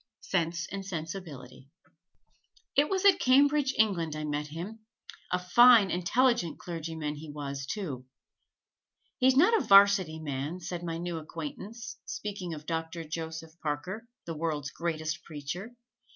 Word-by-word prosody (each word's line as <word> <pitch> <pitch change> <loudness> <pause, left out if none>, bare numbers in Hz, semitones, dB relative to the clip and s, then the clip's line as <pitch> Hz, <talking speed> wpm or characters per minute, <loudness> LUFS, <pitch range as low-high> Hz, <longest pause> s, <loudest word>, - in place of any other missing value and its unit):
Sense 170 -2 -1
and 195 0 -4
Sensibility 160 -8 -7 0.2
[Illustration: - - -39
JANE - - -31
AUSTEN] 285 - +4
It 295 - -6
was 385 0 0
at 390 -2 +7
Cambridge, 280 +1 +4
England, 175 -8 +2
I 155 - -4
met 150 0 -2
him 175 +9 -7 0.5
a 180 - +3
fine, 210 +3 +6
intelligent 235 +2 +2
clergyman 160 -3 -5
he 155 +1 -9
was, 140 -2 -5
too. 140 - -4 1.1
"He's 260 0 +4
not 370 +10 +6
a 445 - +2
'Varsity 195 -5 +6
man," 145 +3 -4
said 175 0 -5
my 165 -1 -3
new 170 -1 -3
acquaintance, 230 - -7
speaking 195 -5 -4
of 150 0 -10
Doctor 165 0 -3
Joseph 160 0 -6
Parker, 180 +10 -4 0.2
the 165 - -4
world's 150 -3 -2
greatest 165 0 -3
preacher. 170 +9 -6
170 Hz, 145 wpm, -29 LUFS, 155-210 Hz, 1.1 s, at